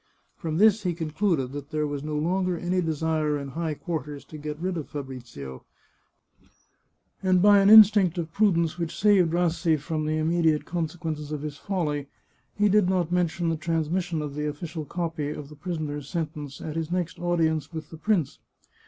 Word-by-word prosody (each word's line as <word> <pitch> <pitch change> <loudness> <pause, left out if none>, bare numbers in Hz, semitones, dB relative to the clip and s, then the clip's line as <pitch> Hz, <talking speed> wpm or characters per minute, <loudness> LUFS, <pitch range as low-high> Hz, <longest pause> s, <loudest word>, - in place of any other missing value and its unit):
From 160 -1 -3
this 215 +2 +5
he 180 -4 -1
concluded 160 -4 0
that 145 0 -7
there 155 -1 -1
was 145 -1 -4
no 150 0 -3
longer 180 +3 0
any 180 +2 0
desire 155 -2 0
in 140 -1 -6
high 160 +2 -3
quarters 150 -3 -5
to 155 - -10
get 150 0 -5
rid 180 +3 -2
of 160 -4 -5
Fabrizio, 120 - -8 1.6
and 185 -1 +3
by 205 +2 +7
an 195 0 +5
instinct 205 -5 +8
of 165 -2 -4
prudence 170 -5 +2
which 165 -1 -3
saved 195 -5 +4
Rassi 170 -1 +2
from 155 +1 -3
the 155 0 0
immediate 160 -1 +2
consequences 160 -3 -4
of 150 -1 -4
his 150 -2 -5
folly, 150 -8 -2 0.5
he 210 0 +3
did 200 -2 +4
not 180 -3 0
mention 175 -1 +1
the 165 - +1
transmission 165 +1 -1
of 145 -2 -5
the 150 +1 -2
official 155 +1 -5
copy 165 -3 -3
of 145 -1 -6
the 150 - -12
prisoner's 150 -3 -4
sentence 150 -5 -4
at 155 -1 -5
his 165 -1 -2
next 180 -1 -2
audience 160 -4 0
with 160 -2 -7
the 160 - -8
prince. 180 -4 0
160 Hz, 180 wpm, -26 LUFS, 150-175 Hz, 1.6 s, instinct